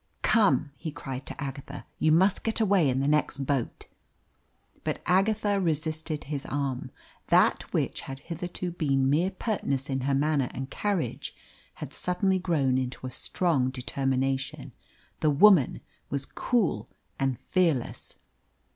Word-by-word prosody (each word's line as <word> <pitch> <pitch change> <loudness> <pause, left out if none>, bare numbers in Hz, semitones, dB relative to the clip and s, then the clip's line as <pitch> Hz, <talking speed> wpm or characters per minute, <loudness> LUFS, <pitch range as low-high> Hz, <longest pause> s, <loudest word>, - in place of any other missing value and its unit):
"Come," 200 -10 +3
he 160 - -5
cried 135 -2 -7
to - - -7
Agatha, 140 0 -6
"you 155 - +3
must 185 +5 +4
get 225 0 +1
away 195 -8 +4
in 130 +1 +1
the 140 - +1
next 145 -2 +1
boat." 135 -3 -2 1.0
But - - -2
Agatha 205 +2 +2
resisted 160 -2 -1
his 145 -1 -4
arm. 140 -3 -2 0.4
That - - +3
which - - -1
had 135 - -7
hitherto 175 +1 -5
been 135 -5 +1
mere 170 +6 +3
pertness 145 - -2
in 135 0 -1
her 135 +1 +1
manner 140 -2 +1
and 130 +2 -5
carriage 190 - -2 0.4
had - - -8
suddenly 185 +1 0
grown 140 -8 +1
into 130 0 -4
a 130 - -4
strong 140 -1 0
determination. 135 +1 -2 0.5
The 155 - +3
woman 155 -1 +5 0.3
was 140 -1 -2
cool 235 -7 0 0.3
and 135 -3 0
fearless. 165 -10 0
145 Hz, 140 wpm, -28 LUFS, 135-180 Hz, 1.0 s, woman